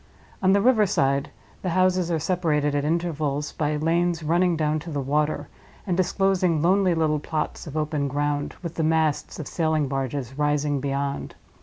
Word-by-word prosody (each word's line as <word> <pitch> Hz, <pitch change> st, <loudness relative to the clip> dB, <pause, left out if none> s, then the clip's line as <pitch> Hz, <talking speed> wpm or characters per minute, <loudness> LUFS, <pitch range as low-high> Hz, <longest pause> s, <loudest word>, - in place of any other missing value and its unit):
On 190 Hz, 0 st, +4 dB
the 200 Hz, +1 st, +4 dB
river 220 Hz, -3 st, +4 dB
side 140 Hz, -7 st, +1 dB, 0.3 s
the 185 Hz, -, -2 dB
houses 185 Hz, 0 st, +2 dB
are 165 Hz, -, +1 dB
separated 155 Hz, -4 st, 0 dB
at 145 Hz, -1 st, 0 dB
intervals 155 Hz, -3 st, -1 dB
by 150 Hz, -1 st, -1 dB
lanes 165 Hz, +2 st, +1 dB
running 170 Hz, +2 st, +2 dB
down 155 Hz, 0 st, +1 dB
to 165 Hz, -, -8 dB
the 145 Hz, -3 st, -2 dB
water, 145 Hz, +1 st, 0 dB, 0.4 s
and 180 Hz, -, 0 dB
disclosing 185 Hz, -2 st, +2 dB
lonely 185 Hz, +2 st, +3 dB
little 155 Hz, -2 st, +1 dB
plots 155 Hz, +2 st, -4 dB
of 150 Hz, +1 st, -5 dB
open 150 Hz, -2 st, -1 dB
ground, 145 Hz, +1 st, -1 dB
with 170 Hz, -2 st, -4 dB
the 165 Hz, -, -2 dB
masts 160 Hz, -2 st, +1 dB
of 155 Hz, -, -6 dB
sailing 155 Hz, -3 st, 0 dB
barges 135 Hz, -1 st, -3 dB
rising 145 Hz, -1 st, +1 dB
beyond. 140 Hz, 0 st, -3 dB
155 Hz, 170 wpm, -24 LUFS, 145-175 Hz, 0.4 s, On